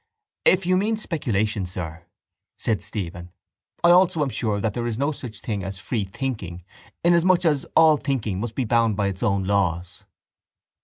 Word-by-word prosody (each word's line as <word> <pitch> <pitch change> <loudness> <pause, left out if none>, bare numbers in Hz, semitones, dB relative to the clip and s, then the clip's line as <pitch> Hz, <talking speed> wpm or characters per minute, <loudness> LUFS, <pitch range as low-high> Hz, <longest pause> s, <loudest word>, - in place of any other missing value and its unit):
—If 185 0 +5
you 185 +1 +3
mean 215 +3 +1
speculation, 110 - -1
sir, 85 -1 -7 0.5
said 110 -6 -1
Stephen, 90 -3 -6 0.5
I 170 - +7
also 175 -3 +4
am 140 - -1
sure 110 -4 -1
that 105 0 -1
there 120 +1 -2
is 115 -2 -2
no 140 +4 +1
such 125 -6 -7
thing 105 -4 -3
as 95 +1 -5
free 105 +1 -2
thinking 95 -6 -5 0.4
inasmuch 175 +1 +4
as 150 -4 +1
all 160 -2 +6
thinking 120 -10 -2
must 115 +1 -4
be 130 - 0
bound 115 -2 +2
by 100 -2 +1
its 95 -1 -7
own 100 -5 +1
laws. 95 -1 -1
110 Hz, 170 wpm, -24 LUFS, 95-150 Hz, 0.5 s, I